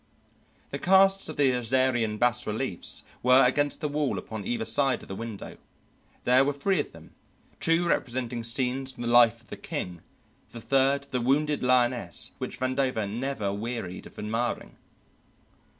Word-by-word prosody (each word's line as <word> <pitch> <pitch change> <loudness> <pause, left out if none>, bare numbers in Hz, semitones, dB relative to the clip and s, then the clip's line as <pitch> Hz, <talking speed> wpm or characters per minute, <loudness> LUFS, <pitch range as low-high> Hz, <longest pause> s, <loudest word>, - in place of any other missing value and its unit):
The 140 - -4
casts 195 +1 +4
of 155 - -7
the 140 -3 +4
Assyrian 120 -2 +1
bas 120 +1 +2
reliefs 110 -3 -2 0.2
were 125 +1 +6
against 145 +4 +1
the 150 - 0
wall 145 -2 -1
upon 110 -3 -6
either 120 -2 -1
side 130 +3 +1
of - - -13
the 95 - -6
window. 115 -1 -7 0.7
There 125 +2 +5
were 145 +1 0
three 165 +8 0
of - - -2
them, - - -15 0.5
two 165 +1 +2
representing 120 -5 -1
scenes 130 +3 -2
from 120 - -8
the 120 - -2
life 120 -1 +5
of 115 - -24
the - - -7
king, 90 -2 -5 0.5
the 115 - -7
third 135 +4 +2
the 125 - -1
wounded 145 +4 +1
lioness 125 -1 +1
which - - -6
Vandover 130 -4 0
never 110 -2 -3
wearied 105 -4 -5
of - - -17
admiring. 115 +3 -3
125 Hz, 160 wpm, -27 LUFS, 115-135 Hz, 0.7 s, were